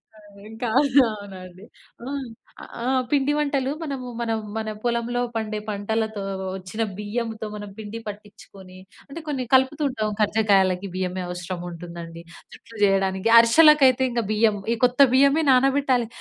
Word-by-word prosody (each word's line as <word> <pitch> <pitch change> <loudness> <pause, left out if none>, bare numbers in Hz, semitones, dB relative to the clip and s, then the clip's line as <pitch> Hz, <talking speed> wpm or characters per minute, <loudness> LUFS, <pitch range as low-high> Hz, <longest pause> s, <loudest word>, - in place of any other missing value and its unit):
ఆ! - - -17 0.3
ఇంకా 225 +2 -5
అవును 280 -2 +5
అవునండి. 190 -1 -11 0.4
ఆ! 265 - -5 0.7
ఆహ్, 255 +1 +1
పిండి 285 0 +2
వంటలు 280 -2 0
మనము 275 -5 -5
మనం 225 -1 -1 0.2
మన 220 -1 -3
పొలంలో 240 0 -1
పండే 215 -1 -3
పంటలతో 215 +1 -2 0.3
వచ్చిన 190 +4 -6 0.2
బియ్యంతో 220 +1 -4
మనం 205 -1 -7
పిండి 220 +1 -7
పట్టించుకొని 200 -2 -11 0.3
అంటే 280 +4 -8
కొన్ని 270 -4 -2
కలుపుతు 265 +4 +3
ఉంటాం 220 -5 -2
కర్జకాయలకి 200 -3 +2
బియ్యమే 185 0 -3
అవసరం 180 0 -6
ఉంటుందండి. 170 -1 -9 0.3
జుట్లు 230 - -14
చేయడానికి, 195 +1 +1
అరిశాలకైతే 265 +1 +6
ఇంక 235 0 0
బియ్యం 215 -1 +2 0.2
ఈ - - -1
కొత్త 250 +1 +2
బియ్యమే 280 +4 +4
నానబెట్టాలి. 265 -2 +2
220 Hz, 135 wpm, -23 LUFS, 200-260 Hz, 0.7 s, అరిశాలకైతే